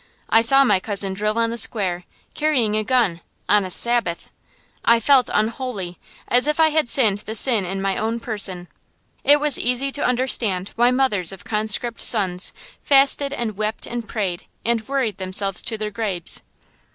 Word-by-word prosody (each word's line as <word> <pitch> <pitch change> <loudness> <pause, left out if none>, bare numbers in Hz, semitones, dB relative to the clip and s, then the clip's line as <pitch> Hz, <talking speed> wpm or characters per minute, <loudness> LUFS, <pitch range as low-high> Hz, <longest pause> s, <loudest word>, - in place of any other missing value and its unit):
I 225 - +5
saw 270 +4 +5
my 205 -8 +2
cousin 200 -1 0
drill 210 +3 -2
on 230 0 +1
the 235 - -3
square, 180 -7 -2 0.3
carrying 260 -9 0
a 215 - -1
gun, 225 -8 0 0.3
on 210 -1 +3
a 185 - -6
Sabbath. 235 -4 +2 0.5
I 235 0 +4
felt 255 +1 +3
unholy, 215 -5 -3 0.3
as 250 +3 +2
if 300 +1 -1
I 320 -1 +5
had 310 -4 0
sinned 215 -7 +2
the 215 +1 -7
sin 225 -3 +5
in 195 +2 -5
my 195 -1 -1
own 225 +2 -2
person. 195 -6 -1 0.6
It 290 +1 +5
was 295 -2 +2
easy 250 +3 -1
to 285 - -2
understand 235 -7 0
why 240 +1 +3
mothers 250 -9 +1
of 195 0 -11
conscript 220 +2 -1
sons 190 -5 0 0.3
fasted 275 0 +3
and 235 -6 -4
wept 215 +1 -3
and 235 -2 -6
prayed 190 -7 -4 0.2
and 230 -1 -1
worried 260 -8 -2
themselves 190 0 -1
to 225 - -3
their 215 0 -5
graves. 200 -5 -1
220 Hz, 175 wpm, -20 LUFS, 195-250 Hz, 0.6 s, I